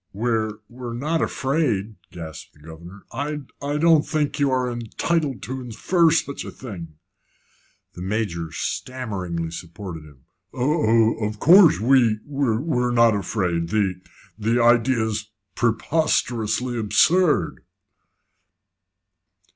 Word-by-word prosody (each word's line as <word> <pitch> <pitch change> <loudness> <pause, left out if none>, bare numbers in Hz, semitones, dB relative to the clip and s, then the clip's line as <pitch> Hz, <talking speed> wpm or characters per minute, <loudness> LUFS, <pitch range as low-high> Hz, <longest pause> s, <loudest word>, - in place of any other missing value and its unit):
"We're 110 0 -1
we're 120 -1 -7
not 155 +6 -1
afraid," 130 -8 -1 0.2
gasped 80 -3 -9
the - - -23
governor. 85 +5 -12
"I 150 +1 -3 0.2
I 145 +1 -2
don't 160 0 +5
think 150 -2 -2
you 140 -1 +3
are 130 -1 +1
entitled 135 - -2
to 130 +6 -5
infer 160 - +2
such 150 -3 -1
a - - -7
thing." 85 - -9 1.0
The 90 - -10
Major 90 -5 -2
stammeringly 90 - -4
supported 85 0 -8
him. 70 -4 -18 0.3
"Of 115 -5 +2
of 105 0 -3
course 175 +3 +7
we 120 -1 +4
we're 135 -1 0
not 115 -2 +4
afraid. 90 -5 -1
The 95 -3 0 0.4
the 115 +3 +1
idea 120 0 +3
is 110 -1 -3 0.2
preposterously 120 -2 0
absurd." 165 - +2
115 Hz, 115 wpm, -23 LUFS, 100-140 Hz, 1.0 s, course